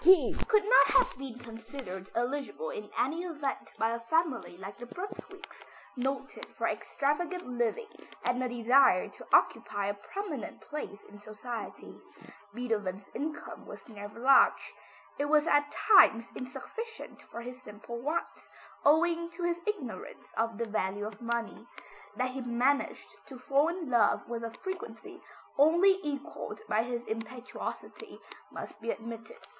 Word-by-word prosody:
He 370 +1 +7
could 425 -2 +5
not - - +7
have - - +3
been 265 -3 -6
considered 225 -5 -8
eligible 285 - -2
in 435 -4 -6
any 315 +6 +1
event 305 -6 -3
by 225 +1 +2
a 235 - -2
family 260 - 0
like 195 +2 -7
the 245 - -7
Brunswicks, 390 - -8 0.3
noted 265 +2 -3
for - - 0
extravagant 350 +6 -1
living 250 - -1 0.3
and 245 +1 +2
a 255 - 0
desire 245 -3 +5
to - - -13
occupy 205 -1 +3
a 200 - 0
prominent 295 - -5
place 295 -9 -6
in 205 0 -13
society. 215 +3 -7 0.6
Beethoven's 205 -4 -2
income 300 +1 -5
was - - -10
never 205 -1 -9
large. 270 +2 +5 0.5
It 285 - +2
was 300 +1 +4
at 290 -3 +3
times 235 - +6
insufficient 455 - -7
for 235 - -8
his 250 +1 -8
simple 220 +1 -8
wants, 305 +7 -3 0.3
owing 335 +3 +4
to 355 - -4
his 345 0 0
ignorance 345 - -4
of 225 -1 0
the 235 - -1
value 205 -1 -1
of 215 0 -7
money. 235 -1 -3 0.5
That 255 0 0
he 265 +1 -5
managed 245 +3 +1 0.2
to 265 - -9
fall 275 +4 +3
in 340 -5 -3
love 230 -4 +4
with 235 -1 -4
a 230 - -2
frequency 365 - -7 0.4
only 345 +6 +6
equalled 290 +5 -5
by 215 - +3
his 240 0 -3
impetuosity, 225 +3 -6 0.3
must 210 - -8
be 230 - -4
admitted. 230 - -5
255 Hz, 145 wpm, -31 LUFS, 230-330 Hz, 0.6 s, He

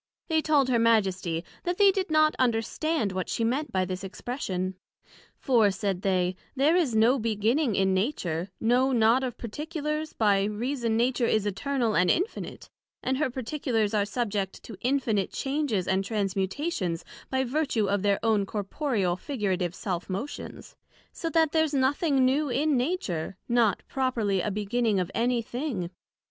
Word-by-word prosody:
They 320 -1 +3
told 295 -4 +3
her 245 -2 +2
Majesty, 190 -7 +2 0.2
That 355 0 -2
they 400 -1 +6
did 380 -1 -2
not 310 0 +4
understand 240 +1 0
what 185 -1 -3
she 230 - -1
meant 265 +6 0
by 185 -1 +1
this 185 +1 -5
expression; 190 -3 -3 0.6
For, 230 -6 +3
said 195 -2 -2
they, 185 -2 +1 0.2
there 285 +5 +3
is 310 -11 +2
no 235 +5 +4
beginning 225 +3 +1
in 190 0 +2
Nature, 185 - -1
no 250 +4 +3
not 235 +2 +4
of 250 -3 -3
Particulars; 305 +5 -4
by 200 -3 +3
reason 230 +2 -1
Nature 245 0 +2
is 215 -2 +1
Eternal 235 +3 -1
and 180 0 +3
Infinite, 375 +7 -2 0.4
and 260 +1 0
her 300 - +1
particulars 240 -4 -1
are 210 -1 +3
subject 205 -3 -3
to 225 - -9
infinite 240 -7 0
changes 270 - -1
and 190 +1 +1
transmutations 195 - -2 0.2
by 265 0 +1
vertue 255 -5 0
of 200 0 +1
their 200 0 +2
own 210 -3 +2
Corporeal, 205 - -1
figurative 190 - -2
self 180 -3 -4
motions; 215 +10 -6 0.4
so 330 - -4
that 320 -2 +3
there's 315 -2 +2
nothing 275 +1 +2
new 280 +3 +2
in 285 +4 +1
Nature, 245 - -2
not 235 -5 +2
properly 235 -8 0
a 210 - -1
beginning 210 +1 0
of 180 0 -2
any 240 0 +1
thing. 235 - -4
230 Hz, 155 wpm, -27 LUFS, 195-275 Hz, 0.6 s, they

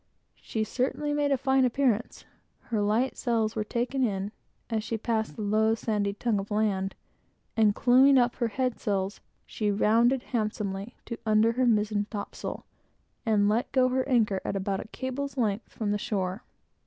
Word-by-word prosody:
She 220 - -2
certainly 275 +6 -1
made 290 -1 +1
a 275 - +3
fine 265 +1 +2
appearance. 245 -3 0 0.5
Her 215 -2 +1
light 220 +6 +1
sails 225 -2 0
were 215 - 0
taken 245 +4 -1
in, 200 -3 -1 0.4
as 220 -2 -1
she 225 0 -2
passed 220 0 -1
the 220 - -5
low, 220 +2 +2
sandy 210 -3 -1
tongue 210 0 0
of 195 - -6
land, 205 -3 0 0.6
and 215 -2 +4
clewing 265 +3 +6
up 245 -1 +2
her 235 - +1
head 250 +2 -2
sails, 200 -2 -2 0.2
she 210 -2 -2
rounded 230 +5 +3
handsomely 210 -1 -2
to, 235 - -5
under 215 +1 +4
her 250 +1 +1
mizen 210 -2 +1
topsail, 205 -3 -6 0.6
and 205 -2 +3
let 220 +4 +1
go 260 -2 +4
the 260 +2 -1
anchor 215 -6 +2
at - - -3
about 195 0 -1
a - - -16
cable's 270 +4 -4
length 220 -3 -1
from 210 -2 -2
the 205 - 0
shore. 190 0 -2
220 Hz, 170 wpm, -28 LUFS, 205-250 Hz, 0.6 s, clewing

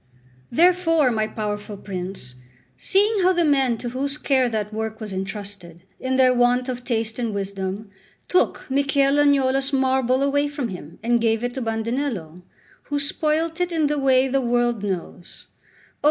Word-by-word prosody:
Therefore, 330 -2 +3
my 215 -1 0
powerful 210 -1 -5
prince, 185 -9 -6 0.4
seeing 405 - +2
how 370 +1 +4
the 345 -2 +2
men 270 -5 +2
to 240 - -5
whose 275 +4 -3
care 260 -4 +2
that 215 -2 -3
work 220 0 -4
was 215 -3 -6
entrusted, 190 -3 -6 0.2
in 260 0 -1
their 260 -1 +5
want 245 +1 +2
of 250 -1 -4
taste 225 -2 -2
and 230 -4 -2
wisdom, 195 +1 -4 0.4
took 365 - +1
Michel 275 +1 +2
Agnolo's 270 -1 +3
marble 265 -1 +2
away 285 +1 +1
from 285 -4 -4
him, 170 -4 -9
and 235 0 +2
gave 225 0 +1
it 245 0 -2
to 265 - -4
Bandinello, 225 - -3 0.4
who 290 - -2
spoilt 315 +3 0
it 355 0 0
in 320 -2 +1
the 295 0 0
way 265 -1 +3
the 270 +1 +1
whole 240 - -2
world 240 -2 +1
knows, 185 -2 -5
oh! - - -32
250 Hz, 170 wpm, -23 LUFS, 215-280 Hz, 0.4 s, their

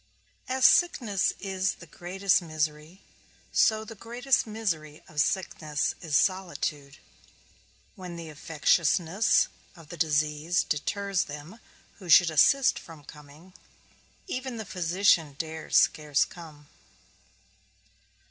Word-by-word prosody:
As 260 0 +1
sickness 235 - +3
is 190 -1 -1
the 170 - -13
greatest 185 +4 0
misery, 155 +2 -4 0.5
so 220 0 +2
the 225 - -9
greatest 240 +4 -1
misery 165 -9 -4
of 150 -1 -1
sickness 155 -4 -1
is 155 -4 +1
solitude; 160 -6 -2 1.0
when 180 -4 -8
the 170 -1 -8
infectiousness 165 +5 +2 0.3
of 165 -4 -16
the 175 - -9
disease 155 +1 +1
deters 195 +5 -1
them 150 +9 -10 0.4
who 185 -3 -11
should 165 +1 +7
assist 260 - +4
from 160 -3 -13
coming; 150 +5 -15 0.7
even 260 -7 -5
the 220 - -6
physician 175 -4 +1
dares 160 0 -2
scarce 150 -2 +2
come. 155 -4 -13
170 Hz, 110 wpm, -27 LUFS, 155-195 Hz, 1.0 s, should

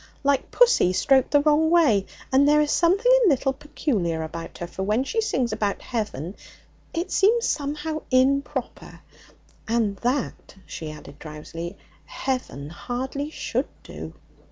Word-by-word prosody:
Like 280 -1 +1
pussy 485 - +4
stroked 265 +6 +3
the 290 - +4
wrong 305 +2 +3
way. 285 - +4 0.3
And 275 +2 +5
there 300 0 +5
is 300 -1 +2
something 390 +9 +3
a 410 - +6
little 270 -2 +2
peculiar 205 - -2
about 165 +1 -7
her, 175 - -4
for 175 +2 -7
when 210 +6 +1
she 450 +11 -1
sings 255 - 0
about 210 -2 -1
heaven 205 - -4 0.6
it 335 +3 -3
seems 455 +4 +3
somehow 300 +2 -2
improper, 265 +1 0 0.7
and 220 -3 +1
that,' 250 -1 -2
she 155 -2 -6
added 145 -1 -12
drowsily, 165 +4 -7 0.3
'heaven 250 - -4
hardly 250 - -4
should - - -2 0.2
do.' - - -9
260 Hz, 140 wpm, -24 LUFS, 195-300 Hz, 0.7 s, a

